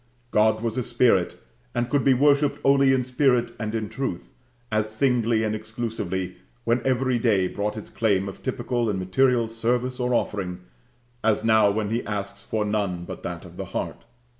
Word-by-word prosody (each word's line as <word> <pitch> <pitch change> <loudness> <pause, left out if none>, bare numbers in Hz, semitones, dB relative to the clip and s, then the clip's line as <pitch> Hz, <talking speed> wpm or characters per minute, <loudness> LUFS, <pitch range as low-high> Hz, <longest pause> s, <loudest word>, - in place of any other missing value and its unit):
God 110 +1 +3
was 115 +1 -1
a - - -1
spirit, 100 -7 +2 0.4
and 120 0 0
could 140 0 +1
be 135 -2 +5
worshipped 145 +2 +3
only 135 -1 +5
in 130 -2 +2
spirit 125 -1 +2
and 110 0 -3
in 110 -1 -2
truth, 130 -8 -4 0.4
as 110 0 +1
singly 115 -1 +1
and 110 -1 0
exclusively 110 -5 -4 0.3
when 120 +1 +1
every 130 -1 +1
day 105 -6 +2
brought 105 +3 -3
its 110 - -8
claim 100 -4 +1
of 95 - -8
typical 120 -2 -1
and 100 - -1
material 115 +6 +2
service 120 +3 -1
or 125 0 +1
offering, 90 -5 -2 0.6
as 110 -1 +2
now 110 -2 +5
when 105 +1 -1
He 115 +2 0
asks 100 -1 -4
for 110 -1 -2
none 100 -4 -1
but - - -7
that - - -6
of - - -13
the - - -4
heart. - - -4
115 Hz, 180 wpm, -25 LUFS, 105-125 Hz, 0.6 s, be